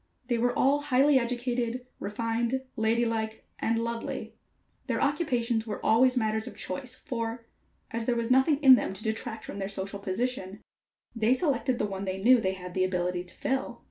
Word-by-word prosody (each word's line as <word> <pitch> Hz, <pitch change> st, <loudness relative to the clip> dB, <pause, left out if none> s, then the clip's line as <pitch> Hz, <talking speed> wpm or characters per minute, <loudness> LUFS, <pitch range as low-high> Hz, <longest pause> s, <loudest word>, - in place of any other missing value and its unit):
They 240 Hz, -1 st, +1 dB
were 245 Hz, +1 st, +1 dB
all 280 Hz, +2 st, +3 dB
highly 280 Hz, 0 st, +4 dB
educated, 245 Hz, 0 st, -2 dB
refined, 230 Hz, +4 st, -1 dB
lady 225 Hz, +2 st, +2 dB
like 220 Hz, -1 st, -3 dB
and 225 Hz, 0 st, +1 dB
lovely. 230 Hz, 0 st, -3 dB, 0.5 s
Their -, -, 0 dB
occupations 245 Hz, -7 st, 0 dB
were 210 Hz, -, -4 dB
always 250 Hz, +3 st, +4 dB
matters 220 Hz, -1 st, 0 dB
of -, -, -8 dB
choice, 245 Hz, +7 st, -3 dB
for, 230 Hz, -4 st, -4 dB, 0.5 s
as 230 Hz, 0 st, -3 dB
there 245 Hz, -, +2 dB
was 235 Hz, +1 st, -1 dB
nothing 265 Hz, +3 st, +5 dB
in 265 Hz, -1 st, +10 dB
them 245 Hz, -, +2 dB
to 195 Hz, -, -8 dB
detract 220 Hz, 0 st, -3 dB
from 200 Hz, -, -7 dB
their 195 Hz, 0 st, -3 dB
social 195 Hz, 0 st, -4 dB
position, 200 Hz, 0 st, -2 dB, 0.6 s
they 230 Hz, +3 st, +3 dB
selected 270 Hz, -4 st, 0 dB
the -, -, 0 dB
one 195 Hz, -1 st, -4 dB
they 190 Hz, 0 st, -2 dB
knew 245 Hz, +4 st, +6 dB
they 190 Hz, -2 st, 0 dB
had 180 Hz, -1 st, -8 dB
the 185 Hz, -, +1 dB
ability 180 Hz, -1 st, -1 dB
to 175 Hz, -, -9 dB
fill. 265 Hz, 0 st, -2 dB
230 Hz, 180 wpm, -28 LUFS, 210-255 Hz, 0.6 s, in